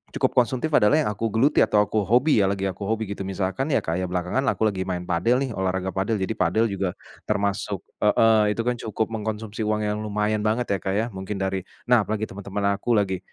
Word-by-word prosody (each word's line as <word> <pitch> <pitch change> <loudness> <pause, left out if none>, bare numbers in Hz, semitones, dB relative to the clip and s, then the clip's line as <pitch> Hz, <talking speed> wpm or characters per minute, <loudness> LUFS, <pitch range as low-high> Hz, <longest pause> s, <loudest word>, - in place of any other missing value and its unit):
cukup - - +1
konsumtif 130 +5 -2
adalah 105 +1 +5
yang 120 - 0
aku 110 +2 -2
geluti, 115 +7 +2
atau 105 - +4
aku 110 +1 -1
hobi 125 +2 +4
ya, 95 - +3
lagi 95 0 -2
aku 100 +2 -6
hobi 110 0 0
gitu, 100 -1 -5
misalkan 95 +8 -2
ya, - - +2
kayak 90 +3 -1
belakangan 90 +10 -1
aku 110 - +1
lagi 95 -3 0
main 90 -1 -2
padel 120 +11 +1
nih, 130 - -3
olahraga 95 -1 -2
padel. 95 +4 -1
Jadi 95 -2 -2
padel 90 +6 +2
juga 95 -2 -2 0.3
termasuk 100 -1 -1 0.2
heeh, 105 0 +4
itu - - -1
kan 120 -1 -1
cukup 110 +1 -2
mengkonsumsi 110 0 -4
uang 105 0 0
yang 105 0 -1
lumayan 105 0 -1
banget, 115 +1 0
ya, 100 - +1
Kak, 95 +2 -2
ya, 110 - +1
mungkin 95 +1 -5
dari 95 0 -1 0.3
nah, 120 -3 +6
apalagi 110 0 -2
teman-teman 100 +1 -5 0.2
aku 120 +1 +1
lagi 95 -3 +1
105 Hz, 215 wpm, -24 LUFS, 95-110 Hz, 0.3 s, nah